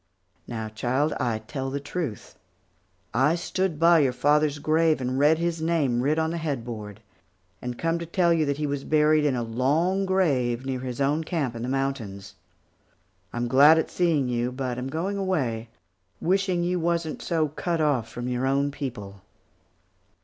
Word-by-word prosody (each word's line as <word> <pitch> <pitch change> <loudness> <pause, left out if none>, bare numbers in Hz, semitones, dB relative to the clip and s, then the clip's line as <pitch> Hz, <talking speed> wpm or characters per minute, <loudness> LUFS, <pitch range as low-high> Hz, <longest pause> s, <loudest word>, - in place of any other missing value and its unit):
Now, 110 -2 -4
child, 125 +7 0
I 120 -5 0
tell 135 +5 -5
the 140 +1 -3
truth. 145 - -5 0.8
I 135 +8 +3
stood 175 -2 -2
by 170 0 +6
your 135 -4 +2
father's 145 +3 +2
grave 155 +1 +2
and 130 +1 -2
read 150 +3 +5
his 170 -1 -2
name 150 -7 +1
writ 145 +4 +1
on 160 0 +1
the 170 - -3
headboard, 115 -8 -5 0.6
and 125 -1 -5
come 165 0 0
to 170 - -6
tell 170 0 +2
you 165 -2 +2
that 140 0 0
he 150 - -1
was 140 -1 -2
buried 155 0 +3
in 140 -3 +2
a 120 - -1
long 155 +12 +1
grave 135 -10 +1
near 130 -1 -2
his 125 -1 -5
own 145 +3 +1
camp 150 -8 -2
in 115 - -5
the 125 - -3
mountains. 115 -8 -3 1.0
I'm 120 0 -2
glad 145 +6 +7
at 160 - -1
seeing 160 -7 +1
you, 120 0 -1
but 125 -1 -3
am 125 - -4
going 170 +8 -2
away, 130 - -1 0.5
wishing 185 -1 +1
you 180 +1 0
wasn't 170 -1 -1
so 160 -3 0
cut 165 +3 -2
off 140 -7 +1
from 120 0 -5
your 125 +1 -1
own 140 +1 +1
people." 115 -9 -7
140 Hz, 175 wpm, -25 LUFS, 125-165 Hz, 1.0 s, glad